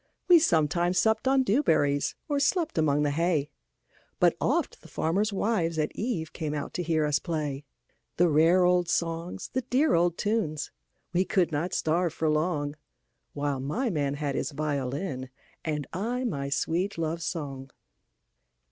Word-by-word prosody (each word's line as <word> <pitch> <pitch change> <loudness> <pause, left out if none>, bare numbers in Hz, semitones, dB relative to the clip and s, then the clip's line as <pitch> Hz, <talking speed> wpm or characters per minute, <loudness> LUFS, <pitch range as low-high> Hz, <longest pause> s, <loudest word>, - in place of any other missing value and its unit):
We 350 -2 +8
sometimes 175 - +2
supped 220 +3 +2
on 265 0 +4
dew 250 +4 +2
berries, 145 - +1
Or 290 -2 0
slept 305 - +1
among 150 -1 +2
the 145 - +1
hay, 160 -1 0 0.7
But - - +4
oft - - 0
the - - -14
farmers' 200 +7 0
wives 190 -5 0
at 155 -1 -1
eveCame 160 -8 -3
out 145 - -4
to - - -2
hear 160 -2 +1
us 150 -1 +2
play; 150 -4 -3 0.5
The 175 - +5
rare 165 +4 +4
old 180 -1 +3
songs, 170 0 -2
the 260 - +1
dear 270 +5 +2
old 170 0 +2
tunes,—We 185 -2 -2
could 185 -2 +1
not 160 +4 -1
starve 165 +1 +1
for 160 - 0
longWhile 145 -2 -3
my 225 - -1
man 145 -4 -1
had 145 -1 -2
his - - -1
violin, 140 -1 -3 0.3
And 150 -3 -2
I 235 +8 -2
my 140 - -2
sweet 175 +7 -1
love 165 +1 -2
song. 140 -6 -4
165 Hz, 150 wpm, -28 LUFS, 150-185 Hz, 0.7 s, We